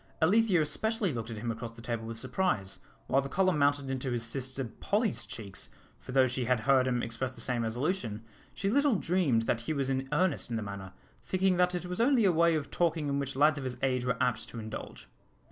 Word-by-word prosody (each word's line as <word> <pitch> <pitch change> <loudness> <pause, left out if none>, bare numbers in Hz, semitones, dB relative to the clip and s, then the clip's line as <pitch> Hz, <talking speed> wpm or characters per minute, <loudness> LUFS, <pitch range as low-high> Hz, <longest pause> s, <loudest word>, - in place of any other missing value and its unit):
Alethea 195 +2 +4
especially 220 +2 0
looked 115 -1 -4
at 115 - -6
him 115 +2 -2
across 115 0 -6
the 115 - -12
table 115 -1 -3
with 115 0 -5
surprise, 105 - -1 0.3
while 135 - +2
the 140 - -6
colour 185 +2 +2
mounted 145 -2 +2
into 130 0 -2
his 120 -2 -1
sister 130 +3 -2
Polly's 205 - -1
cheeks, 100 -4 -7 0.3
for - - -9
though 130 0 +5
she 130 0 -2
had 125 -1 +2
heard 130 +1 +4
him 125 -2 0
express 125 +3 -3
the - - -10
same 125 -2 -1
resolution, 115 - -2 0.3
she 195 - -2
little 280 +3 +3
dreamed 165 - +2
that 115 0 0
he 120 - -2
was 135 -2 -1
in 135 0 -2
earnest 155 -3 +1
in 115 - -2
the 110 - -2
matter, 100 -2 -7 0.3
thinking 185 -1 +1
that 180 0 +3
it 175 - -3
was 180 +4 -2
only 245 -3 +4
a 190 - +5
way 170 0 +4
of 150 -2 -3
talking 165 -4 +1
in 140 0 0
which 140 -1 -3
lads 150 +2 +4
of - - -6
his 125 -1 -4
age 130 -2 +1
were 125 -1 0
apt 125 -3 0
to - - -9
indulge. 110 - -7
135 Hz, 230 wpm, -30 LUFS, 115-175 Hz, 0.3 s, though